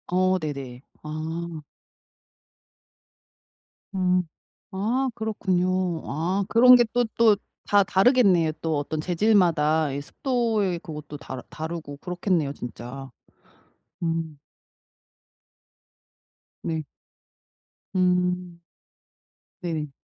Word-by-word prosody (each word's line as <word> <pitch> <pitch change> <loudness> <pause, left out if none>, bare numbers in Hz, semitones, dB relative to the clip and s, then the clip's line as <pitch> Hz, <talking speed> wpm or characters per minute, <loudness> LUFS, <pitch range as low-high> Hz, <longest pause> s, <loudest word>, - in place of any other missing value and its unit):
어 185 +1 +2
네네. 140 -6 -5 0.2
아. 160 +2 -5 2.3
음. 185 -1 +2 0.5
아 230 +8 0
그렇군요. 185 -5 0
아 175 +7 -1
그런게 245 +2 +7
또 245 - +3
또 225 -2 +6 0.3
다 205 -1 +4
다르겠네요. 190 - +4
또 160 -2 0
어떤 150 +2 -3
재질마다 165 -4 +3
이 140 - -3
습도의 220 - 0
그것도 150 -2 -8
다 130 -3 -7
다르고 160 -2 -6
그렇겠네요. 175 -3 -1
진짜. 125 +2 -8 0.9
음. 165 -2 -2 2.3
네. 160 -1 -2 1.1
음. 180 -1 +1 1.0
네. 160 -5 -3
175 Hz, 155 characters per minute, -25 LUFS, 155-190 Hz, 2.3 s, 그런게